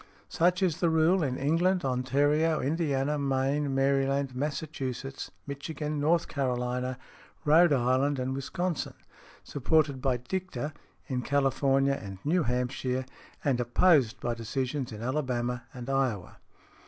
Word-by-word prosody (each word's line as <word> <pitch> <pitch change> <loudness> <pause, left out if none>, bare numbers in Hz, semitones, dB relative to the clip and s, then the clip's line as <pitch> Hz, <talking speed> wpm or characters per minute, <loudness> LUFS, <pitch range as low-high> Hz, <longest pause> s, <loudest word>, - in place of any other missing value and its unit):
Such 180 +3 +2
is 175 -3 +1
the 170 - +3
rule 160 +4 +3
in 130 -4 -1
England, 170 +5 +1
Ontario, 145 +5 +2
Indiana, 145 -1 0
Maine, 135 +1 0
Maryland, 135 0 +1
Massachusetts, 135 -2 -4 0.2
Michigan, 150 +1 -4
North 165 +4 +2
Carolina, 125 -2 -2 0.5
Rhode 160 +3 +6
Island 135 +2 +2
and 130 +1 -2
Wisconsin, 165 +5 -3 0.5
supported 145 -1 +1
by 130 -2 +1
dicta 165 +2 -4 0.3
in 125 -2 -2
California 135 0 +2
and 95 -1 -7
New 175 +4 +3
Hampshire, 125 0 -1 0.4
and 135 -4 +2
opposed 125 0 +3
by 120 - -1
decisions 125 +3 -3
in 110 +1 -7
Alabama 125 -3 -1
and 125 -1 -8
Iowa. 130 -9 -1
135 Hz, 120 wpm, -29 LUFS, 125-150 Hz, 0.5 s, Rhode